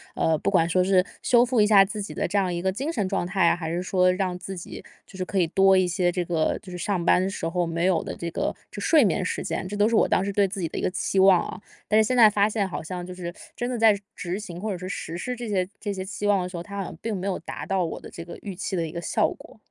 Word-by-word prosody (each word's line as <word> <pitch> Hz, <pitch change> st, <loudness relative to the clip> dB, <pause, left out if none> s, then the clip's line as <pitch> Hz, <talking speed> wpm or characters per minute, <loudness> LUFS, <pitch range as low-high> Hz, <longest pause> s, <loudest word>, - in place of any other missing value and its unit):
呃， 160 Hz, -1 st, +2 dB
不 -, -, 0 dB
管 165 Hz, -4 st, +3 dB
说 180 Hz, +2 st, +2 dB
是 185 Hz, -1 st, +3 dB, 0.2 s
修 245 Hz, 0 st, +4 dB
复 245 Hz, -3 st, +2 dB
一 210 Hz, -, +4 dB
下 200 Hz, -2 st, +7 dB
自 210 Hz, +1 st, -5 dB
己 200 Hz, -, -6 dB
的 -, -, -1 dB
这 200 Hz, +3 st, -1 dB
样 185 Hz, -3 st, +1 dB
一 170 Hz, -, -2 dB
个 190 Hz, -, +1 dB
精 270 Hz, -, -2 dB
神 210 Hz, -, -1 dB
状 175 Hz, -, -1 dB
态 185 Hz, -2 st, +2 dB
啊， -, -, +4 dB
还 160 Hz, -2 st, -5 dB
是 175 Hz, +1 st, -1 dB
说 185 Hz, 0 st, +3 dB
让 185 Hz, -1 st, -1 dB
自 190 Hz, +1 st, -7 dB
己 175 Hz, -, -8 dB, 0.2 s
就 195 Hz, -, -16 dB
是 185 Hz, -, -3 dB
可 195 Hz, +1 st, -4 dB
以 170 Hz, -, +3 dB
多 195 Hz, +2 st, +4 dB
一 185 Hz, -1 st, +3 dB
些 175 Hz, 0 st, +1 dB
这 175 Hz, -1 st, -2 dB
个 165 Hz, -2 st, 0 dB
就 185 Hz, -, -12 dB
是 -, -, -5 dB
上 180 Hz, -2 st, -1 dB
班 185 Hz, +2 st, +3 dB
时 165 Hz, -3 st, -4 dB
候 175 Hz, +1 st, 0 dB
没 165 Hz, +1 st, -1 dB
有 185 Hz, -3 st, +2 dB
的 -, -, -5 dB
这 170 Hz, -, -4 dB
个 -, -, -1 dB, 0.2 s
就 -, -, -8 dB
睡 305 Hz, -8 st, +5 dB
眠 185 Hz, 0 st, +1 dB
时 -, -, -2 dB
间， 185 Hz, -, -3 dB
这 205 Hz, +2 st, -5 dB
都 205 Hz, +1 st, +4 dB
是 230 Hz, -, +1 dB
我 -, -, +5 dB
当 185 Hz, -, +2 dB
时 200 Hz, -, -2 dB
对 200 Hz, 0 st, +3 dB
自 195 Hz, +1 st, -4 dB
己 165 Hz, -, -1 dB
的 -, -, -7 dB
一 -, -, -2 dB
个 -, -, +1 dB
期 190 Hz, +1 st, -1 dB
望 190 Hz, -2 st, +6 dB
啊。 -, -, -8 dB, 0.3 s
但 215 Hz, -, +3 dB
是 220 Hz, -, +5 dB
现 255 Hz, +2 st, 0 dB
在 220 Hz, -3 st, +8 dB
发 205 Hz, 0 st, +2 dB
现 210 Hz, -3 st, -1 dB
好 180 Hz, -, -5 dB
像 175 Hz, +2 st, -5 dB
就 180 Hz, -, -8 dB
是 175 Hz, -1 st, -6 dB, 0.2 s
真 245 Hz, +1 st, -3 dB
的 245 Hz, -, -2 dB
在 220 Hz, -2 st, +5 dB, 0.2 s
执 180 Hz, +2 st, -4 dB
行 175 Hz, -5 st, -8 dB
或 215 Hz, +1 st, -3 dB
者 185 Hz, -, -3 dB
是 185 Hz, +1 st, -7 dB
实 170 Hz, -3 st, -5 dB
施 250 Hz, +7 st, -3 dB
这 240 Hz, -2 st, -5 dB
些 190 Hz, -3 st, 0 dB
这 205 Hz, -2 st, -3 dB
些 190 Hz, -1 st, -4 dB
期 205 Hz, +1 st, -4 dB
望 200 Hz, -2 st, +3 dB
的 180 Hz, -, -4 dB
时 180 Hz, -, -7 dB
候， 170 Hz, -, -5 dB
它 200 Hz, +1 st, -9 dB
好 195 Hz, -, -1 dB
像 165 Hz, -, -8 dB
并 225 Hz, -2 st, -2 dB
没 190 Hz, +1 st, -3 dB
有 190 Hz, -, -1 dB
达 -, -, -7 dB
到 190 Hz, -2 st, 0 dB
我 -, -, -5 dB
的 -, -, -10 dB
这 170 Hz, -, -8 dB
个 170 Hz, -, -9 dB
预 200 Hz, -, -6 dB
期 190 Hz, +1 st, -3 dB
的 165 Hz, -2 st, 0 dB
一 155 Hz, -, -6 dB
个 170 Hz, -, -5 dB
效 170 Hz, -, +1 dB
果。 -, -, -12 dB
190 Hz, 350 characters per minute, -25 LUFS, 175-205 Hz, 0.3 s, 在